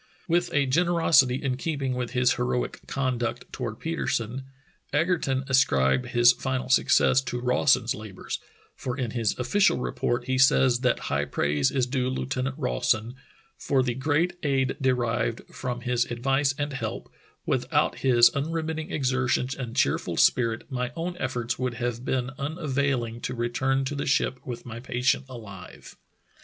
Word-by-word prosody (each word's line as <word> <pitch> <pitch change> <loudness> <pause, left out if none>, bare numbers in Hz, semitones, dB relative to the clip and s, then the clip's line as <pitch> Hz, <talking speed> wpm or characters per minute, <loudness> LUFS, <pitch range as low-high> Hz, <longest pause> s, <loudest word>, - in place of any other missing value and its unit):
With 175 0 +1
a 145 -1 +2
generosity 160 -3 +3
in 130 -2 -1
keeping 140 -3 -2
with 125 -1 -4
his 125 -1 +3
heroic 60 0 -2
conduct 125 -3 -2
toward 120 -3 -5
Petersen, 130 -6 -2 0.5
Egerton 145 -4 +1
ascribed 70 - +3
his 120 0 +5
final 130 0 -3
success 130 0 +4
to 120 - -3
Rawson's 125 -1 +2
labors, 105 -3 -6 0.4
for 125 0 -4
in 125 -4 -2
his 115 -4 -1
official 160 +11 +2
report 120 0 -1
he 130 0 0
says 130 -2 +5
that 125 -1 +1
high 70 0 +1
praise 70 0 +1
is 130 -2 +1
due 125 0 -1
Lieutenant 130 +1 -3
Rawson 125 -4 0 0.5
"for 135 -2 +1
the 125 -1 -1
great 155 +7 0
aid 135 -3 +1
derived 125 -3 0
from 125 -1 -4
his 125 -1 +1
advice 135 +3 0
and 145 -1 -2
help; 135 - -5 0.3
without - - 0
his 120 -2 +5
un 140 +3 -1
remitting 160 -1 -3
exertions 130 -2 0
and 125 -4 -6
cheerful 125 - 0
spirit, 115 -2 +3
my 125 -1 -2
own 175 +2 -3
efforts 120 0 -2
would 125 -2 -2
have 120 0 -3
been 130 -1 -1
unavailing 140 -6 -1
to - - -4
return 130 +3 0
to 140 - -3
the 140 - -3
ship 135 -2 +1
with 120 -1 -6
my 115 -1 -7
patient 125 +2 0
alive." 100 -7 -11
130 Hz, 150 wpm, -26 LUFS, 120-135 Hz, 0.5 s, his